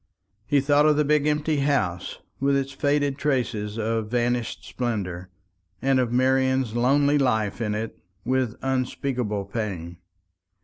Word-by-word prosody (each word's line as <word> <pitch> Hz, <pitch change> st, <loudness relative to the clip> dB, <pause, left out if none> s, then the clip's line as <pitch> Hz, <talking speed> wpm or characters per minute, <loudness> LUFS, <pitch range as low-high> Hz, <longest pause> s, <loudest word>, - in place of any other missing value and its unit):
He 145 Hz, -2 st, +3 dB
thought 145 Hz, +2 st, +4 dB
of 150 Hz, -1 st, +4 dB
the 150 Hz, -, +3 dB
big 150 Hz, 0 st, +2 dB
empty 150 Hz, 0 st, +1 dB
house, 135 Hz, -12 st, 0 dB, 0.2 s
with 140 Hz, +1 st, +2 dB
its 135 Hz, 0 st, -2 dB
faded 145 Hz, 0 st, 0 dB
traces 115 Hz, -7 st, -1 dB
of 110 Hz, -1 st, -1 dB
vanished 120 Hz, 0 st, -1 dB
splendour, 95 Hz, -7 st, -3 dB, 0.5 s
and 135 Hz, +3 st, +2 dB
of 125 Hz, -2 st, 0 dB
Marian's 130 Hz, -1 st, +2 dB
lonely 140 Hz, +4 st, +3 dB
life 110 Hz, -5 st, 0 dB
in 105 Hz, -2 st, -1 dB
it, 110 Hz, +1 st, -5 dB, 0.3 s
with 130 Hz, -2 st, 0 dB
unspeakable 130 Hz, -5 st, -1 dB
pain. 95 Hz, -5 st, -4 dB
130 Hz, 135 wpm, -25 LUFS, 110-140 Hz, 0.5 s, thought